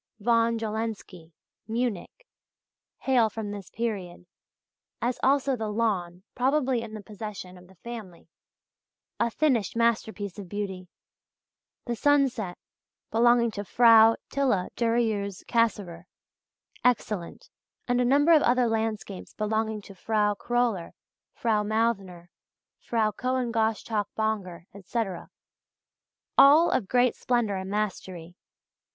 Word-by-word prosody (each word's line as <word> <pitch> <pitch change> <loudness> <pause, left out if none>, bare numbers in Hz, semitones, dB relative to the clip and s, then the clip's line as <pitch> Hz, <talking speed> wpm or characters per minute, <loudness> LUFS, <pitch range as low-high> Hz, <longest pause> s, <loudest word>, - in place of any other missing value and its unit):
von 230 +1 +2
Jawlensky, 215 -6 -5 0.4
Munich, 235 - -3 0.8
hail 245 -4 +3
from 215 -1 -5
this 200 -3 -8
period, 195 -7 -4 0.7
as 245 +1 -2
also 275 0 +2
"The 220 -2 -4
Lawn," 190 -5 -1
probably 260 -1 +1
in 220 -1 -8
the 210 - -8
possession 205 -3 -8
of 180 0 -15
the 190 - -19
family 210 -3 -9 0.9
a 235 - +2
finished 240 -5 0
masterpiece 220 -4 -1
of 190 -3 -9
beauty; 190 -2 -5 1.0
"The 240 - -2
Sunset" 255 -9 +1 0.5
belonging 235 0 +4
to 205 -1 -5
Frau 225 +1 +6 0.2
Tilla 255 -10 0
Durieux 225 -5 -1
Cassirer 200 -7 0 0.8
excellent; 215 -7 -1 0.4
and 245 0 +2
a - - +3
number 285 +6 +4
of 315 -2 +7
other 250 -1 +3
landscapes 220 -4 -3
belonging 220 0 -1
to 195 - -12
Frau 210 +2 0
Kröller, 235 -4 -1 0.4
Frau 220 -3 +1
Mauthner, 205 -5 -1 0.5
Frau 220 -2 0
Cohen 255 +1 -2
Gosschalk 220 -2 0
Bonger, 205 -6 -2
etc. 195 -1 -4 1.1
all 300 +5 +7
of 210 - 0
great 250 +1 +3
splendour 235 -5 0
and 190 0 -5
mastery. 185 -4 -4
220 Hz, 115 wpm, -27 LUFS, 200-240 Hz, 1.1 s, of